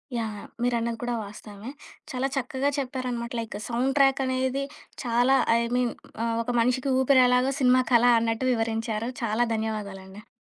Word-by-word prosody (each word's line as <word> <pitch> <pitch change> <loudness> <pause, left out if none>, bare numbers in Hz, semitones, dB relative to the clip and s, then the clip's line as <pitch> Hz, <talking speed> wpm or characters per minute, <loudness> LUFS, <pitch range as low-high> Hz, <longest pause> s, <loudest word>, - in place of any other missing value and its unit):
Yeah! 225 -2 -2
Yeah! - - -11
మీరన్నది 235 -1 0
కూడా 245 0 -2
వాస్తవమే. 205 +3 -9 0.4
చాలా 260 +1 -1
చక్కగా 265 +1 -1
చెప్పారనమాట. 250 -3 -3
లైక్ 225 -3 -5
సౌండ్ 245 +3 0
ట్రాక్ 270 -1 +4
అనేది 260 +1 -1 0.4
చాలా. 245 +2 +3 0.2
ఐ - - +2 0.2
మీన్ 250 -1 +1 0.3
ఆహ్, 230 0 0
ఒక 240 - -7
మనిషికి 255 +3 +1
ఊపిరి 265 0 +5
ఎలాగో 250 +2 +3
సినిమాకలా 250 -2 +4
అన్నట్టు 225 +2 -1
వివరించారు. 225 0 -2
చాలా 230 +2 +1
ధన్యవాదాలండి. 205 -2 -5
245 Hz, 145 wpm, -26 LUFS, 225-255 Hz, 0.4 s, ఊపిరి